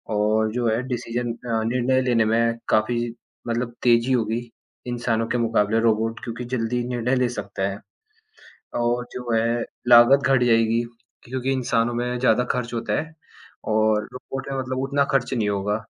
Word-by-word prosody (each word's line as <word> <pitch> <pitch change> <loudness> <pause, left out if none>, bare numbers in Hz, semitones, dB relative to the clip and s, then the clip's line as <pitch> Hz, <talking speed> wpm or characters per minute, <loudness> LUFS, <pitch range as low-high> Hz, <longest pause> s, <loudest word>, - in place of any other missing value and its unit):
और 110 +1 +2
जो 120 -1 0
है 115 +3 +1
डिसीज़न 120 0 -2
अ, 115 -2 -2
निर्णय 125 +2 +1
लेने 120 -3 +2
में 115 +1 +2
काफ़ी 115 +2 +2 0.5
मतलब 120 0 -2
तेजी 120 +1 +4
होगी। 115 0 -1 0.4
इंसानों 115 -2 -1
के 125 - -1
मुकाबले 115 -2 +1
रोबोट 115 0 +1
क्योंकि 120 0 -5
जल्दी 120 +1 -1
निर्णय 125 +1 0
ले 125 -1 +1
सकता 100 -5 -5
है 100 - -6 1.0
और 120 +1 0
जो 125 -1 -4
है 115 +1 +1 0.2
लागत 125 +4 +7
घट 135 -2 +3
जाएगी 115 0 +3 0.4
क्योंकि 130 +2 -2
इंसानों 120 -2 0
में 125 +1 -2
ज़्यादा 125 -1 +3
खर्च 120 -1 -3
होता 115 0 -1
है 160 +1 -9 0.6
और 110 -1 +2
रोबोट 130 +1 -7
है 135 - -2
मतलब 130 0 -3
उतना 140 +1 +1
ख़र्च 135 -2 +1
नहीं 110 -4 0
होगा। 105 +2 -1
120 Hz, 160 wpm, -23 LUFS, 115-125 Hz, 1.0 s, लागत